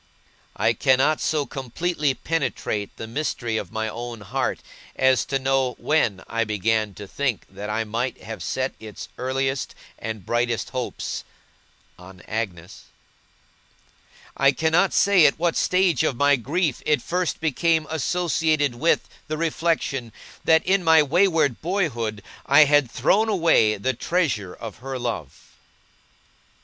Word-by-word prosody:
I 115 - +2
cannot 135 +5 +2
so 150 -2 0
completely 145 +2 -2
penetrate 130 -11 -2
the - - -6
mystery 115 -2 -2
of 95 -4 -5
my 110 0 -2
own 120 0 -6
heart, 100 - -2 0.3
as 130 -1 +3
to 135 - -1
know 135 -1 +1
when 115 -11 +1
I 115 0 0
began 110 -1 0
to 100 +1 -9
think 130 0 -2
that 105 +1 -7
I 110 +1 0
might 115 +3 -3
have 110 +2 -7
set 130 0 -2
its 110 -2 -9
earliest 135 +1 -2 0.2
and 110 -4 -6
brightest 120 -1 -1
hopes 130 -2 -4 0.8
on 90 0 -13
Agnes. 95 -6 -5 1.5
I 135 0 +4
cannot 160 +5 +2
say 190 -6 +5
at 140 - 0
what 170 0 0
stage 180 -7 +2
of 130 - 0
my 145 +3 +4
grief 145 +4 -1
it 150 -5 +1
first 180 -1 -1
became 160 +1 +1
associated 160 -3 0
with 155 +8 +1 0.2
the 155 - -3
reflection, 155 -7 -1 0.3
that, 160 0 +4
in 190 0 +2
my 160 -2 +6
wayward 160 - +2
boyhood, 120 - -2 0.2
I 140 +3 +8
had 145 -3 +3
thrown 200 - +2
away 165 - +3
the 130 +7 -1
treasure 130 - -1
of 115 -3 -8
her 135 +2 -5
love. 115 - -5
135 Hz, 135 wpm, -23 LUFS, 115-160 Hz, 1.5 s, I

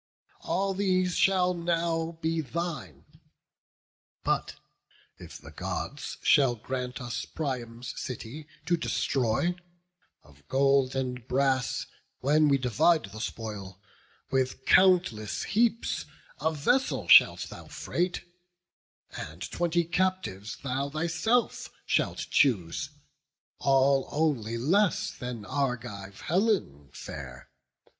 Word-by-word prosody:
All 195 0 -1
these 185 -2 +1
shall 185 -2 +3
now 170 -1 -1
be 165 0 +1
thine: 170 0 -5 1.2
but - - 0 0.6
if - - -10
the - - -13
Gods - - -5
Shall 135 -4 +5
grant 125 +2 -4
us 120 -2 -4
Priam's 125 -4 -4
city 130 +4 -7 0.2
to 175 +2 +3
destroy, 135 +1 0 0.7
Of 70 0 -21
gold 135 -1 +3
and 125 -2 -3
brass, 130 -1 +1 0.3
when 150 +3 +4
we 140 -1 +4
divide 125 - +2
the 110 +2 -7
spoil, 100 -5 -6 0.5
With 130 0 0
countless 175 - +4
heaps 230 +2 +1 0.3
a 160 - +1
vessel 245 - +1
shalt - - +7
thou - - -10
freight, 180 +1 -2 0.9
And 80 +4 -7
twenty 175 0 +1
captives 170 - -1
thou 135 +1 -1
thyself 170 +11 0 0.2
shalt - - 0
choose, 95 - +2 0.7
All 135 0 +3
only 135 -8 0
less 180 - +2
than 120 -4 -6
Argive 120 -8 -3
Helen 175 - 0
fair. 65 -2 -9
135 Hz, 105 wpm, -28 LUFS, 120-170 Hz, 1.2 s, shalt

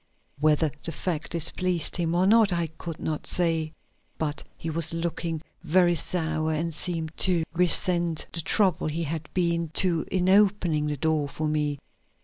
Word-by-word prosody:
Whether 155 0 +2
the 165 - -3
fact 165 0 -3
displeased 170 +1 -1
him 170 -1 -1
or 180 +2 +3
not 215 0 +5
I 170 -1 0
could 160 0 -8
not 155 -1 -4
say, 165 -3 +1 0.5
but 150 -2 -3
he 165 - -4
was 165 +1 +2
looking 165 -1 -3 0.2
very 175 +1 +3
sour 160 -2 0
and 165 +2 -2
seemed 165 -1 -4
to 180 -3 +3
resent 175 -1 +3
the 165 - 0
trouble 185 -1 +1
he 160 +2 -2
had 160 0 -5
been 170 -2 0
to 170 -4 +3
in 185 -1 +1
opening 190 -6 +3
the 150 -1 -2
door 155 -1 0
for 155 +2 -3
me. 150 -1 -1
165 Hz, 160 wpm, -26 LUFS, 155-175 Hz, 0.5 s, not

